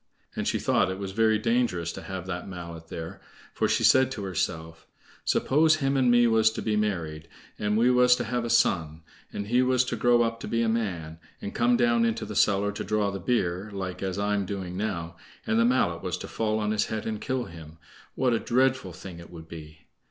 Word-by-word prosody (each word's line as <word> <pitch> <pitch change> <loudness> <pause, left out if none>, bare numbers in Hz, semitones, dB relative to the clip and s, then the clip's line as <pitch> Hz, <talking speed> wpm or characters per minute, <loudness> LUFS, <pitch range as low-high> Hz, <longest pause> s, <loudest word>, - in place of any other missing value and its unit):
And - - -2
she - - +1
thought - - +2
it 95 - -4
was 100 -1 -5
very 110 +1 +3
dangerous 110 -7 0
to - - -8
have 95 -2 -6
that 90 -1 -5
mallet 85 -3 -8
there, 80 0 -7 0.3
for - - +1
she - - +1
said 130 -1 +5
to 105 - -6
herself: 80 -3 -4 0.4
"Suppose 155 +3 +3
him 140 -2 0
and 130 -2 +3
me 120 0 +5
was 110 -1 +4
to - - -4
be 110 -2 0
married, 85 -7 -2 0.3
and 105 0 0
we 120 +3 +4
was 125 0 +5
to - - -3
have 120 +1 -2
a 120 - -3
son, 80 -9 +1 0.3
and 100 - -4
he 120 +4 +2
was 130 0 +2
to 125 - -2
grow 120 +1 +4
up 115 0 -2
to - - -7
be 115 0 0
a - - +1
man, 90 -8 -2 0.2
and 100 - -6
come 120 +1 +3
down 120 -1 +3
into 115 -1 0
the 105 - -7
cellar 100 0 +2
to 105 - -5
draw 105 -1 0
the 100 - -5
beer, 95 -2 -1
like 95 -2 -5
as 95 -1 -3
I'm 100 0 0
doing 95 -3 -5
now, 90 -5 -3 0.3
and 110 +1 +1
the 115 - +4
mallet 90 -9 +1
was - - -3
to - - -7
fall 110 -1 -1
on 105 -1 -1
his 110 - +1
head 110 -1 -4
and 110 -2 -3
kill 130 -1 -1
him, 80 -1 -12 0.4
what 125 -2 +2
a 115 - +1
dreadful 130 -6 +1
thing 90 0 -10
it 85 - -12
would 80 -2 -11
be!" 80 -1 -11
105 Hz, 225 wpm, -27 LUFS, 90-120 Hz, 0.4 s, said